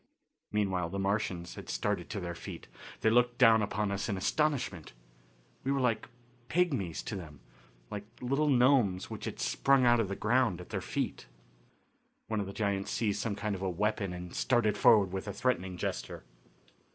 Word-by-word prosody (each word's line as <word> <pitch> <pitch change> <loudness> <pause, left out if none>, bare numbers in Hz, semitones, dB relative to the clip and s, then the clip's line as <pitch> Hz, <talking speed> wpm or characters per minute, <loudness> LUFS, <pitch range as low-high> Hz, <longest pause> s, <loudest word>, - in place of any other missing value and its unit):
Meanwhile 95 -5 0
the 100 - -4
Martians 95 -3 -1
had - - -10
started - - -1
to - - -3
their 85 -1 -4
feet. 85 - -9 0.3
They 110 - +4
looked 120 +1 +3
down 115 -2 +6
upon 105 0 -1
us 100 +2 -2
in 100 - -1
astonishment. 125 - -1 0.7
We 135 - 0
were 140 - +1
like 115 -4 0 0.4
pigmies 135 - 0
to 110 - -4
them; 80 -7 -8 0.5
like 105 0 -5
little 135 +4 +1
gnomes 125 -8 +3
which - - -6
had - - -5
sprung 135 -2 +3
out 120 0 +5
of 110 - +1
the 100 - -3
ground 120 -7 +2
at 90 - -10
their - - -2
feet. - - -3 1.0
One 110 -1 -2
of 100 - -2
the - - -5
giants 100 -2 -1
seized 105 -3 0
some 105 -3 -2
kind 105 0 -2
of 95 - -5
a 95 - 0
weapon 100 +1 -1
and 90 0 -7
started 120 -4 +2
forward 100 -4 +5
with 95 +2 -4
a 100 - -3
threatening 95 -5 -1
gesture. - - -4
105 Hz, 180 wpm, -31 LUFS, 95-120 Hz, 1.0 s, down